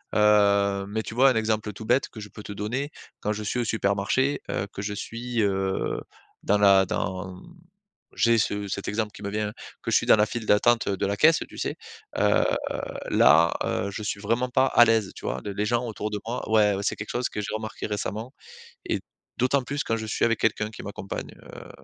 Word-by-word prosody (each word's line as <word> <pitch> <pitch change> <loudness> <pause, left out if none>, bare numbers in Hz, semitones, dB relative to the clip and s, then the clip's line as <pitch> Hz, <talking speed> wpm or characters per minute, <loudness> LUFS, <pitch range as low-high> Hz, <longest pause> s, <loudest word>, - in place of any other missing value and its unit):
Heu, 100 -2 +4
mais 110 +2 -2
tu 110 - -8
vois 135 +3 +6
un - - -1
exemple 110 -1 0
tout 105 +3 -9
bête 125 +4 +2
que 110 - -11
je 105 0 -8
peux 105 - -11
te - - -8
donner. 120 +9 -3 0.3
Quand 105 - 0
je 105 - -5
suis 105 - -2
au - - +1
supermarché, 110 +6 +1
heu, 100 - -2
que 100 - -6
je 105 0 -3
suis, 115 +3 -3
heu, 95 -2 0 0.4
dans 105 +1 +2
la 100 -1 +6
dans 95 0 -4 0.7
j'ai 115 -1 +4
ce 105 -1 0
cet 100 0 -4
exemple 105 0 -1
qui 105 - -11
me 100 - -2
vient, 105 0 -1 0.3
que - - -4
je - - +3
suis - - 0
dans - - +8
la 105 - +4
file 120 -1 -5
d'attente 115 +2 +3
de 100 -2 -1
la 100 +1 -1
caisse, 160 +6 +5
tu - - -12
sais? - - -2 0.4
Heu, - - +4 0.7
là, 80 +5 +6
heu, 100 - -1
je 105 - -6
suis 105 - -3
vraiment 115 +5 0
pas 130 +2 +3
à 120 - +6
l'aise. 110 -4 +2
Tu - - -10
vois? 65 - -2
Le 100 - -4
les 105 +2 -1
gens 120 +3 +1
autour 105 -1 -4
de 105 - -2
moi 120 - -3
ouais 105 -2 +4
c'est - - 0
quelque 105 - -7
chose 120 0 -1
que 105 - -4
j'ai 100 - -5
remarqué 110 0 -5
récemment. 105 +3 -4 0.5
Et - - -1 0.4
d'autant 130 +2 +2
plus 140 +3 -3
quand 115 - -1
je 110 - -5
suis 110 - -1
avec 115 -1 +1
quelqu'un 105 -1 +1
qui 110 - -10
m'accompagne, 100 -1 -6
heu, - - -11
105 Hz, 225 wpm, -26 LUFS, 100-115 Hz, 0.7 s, dans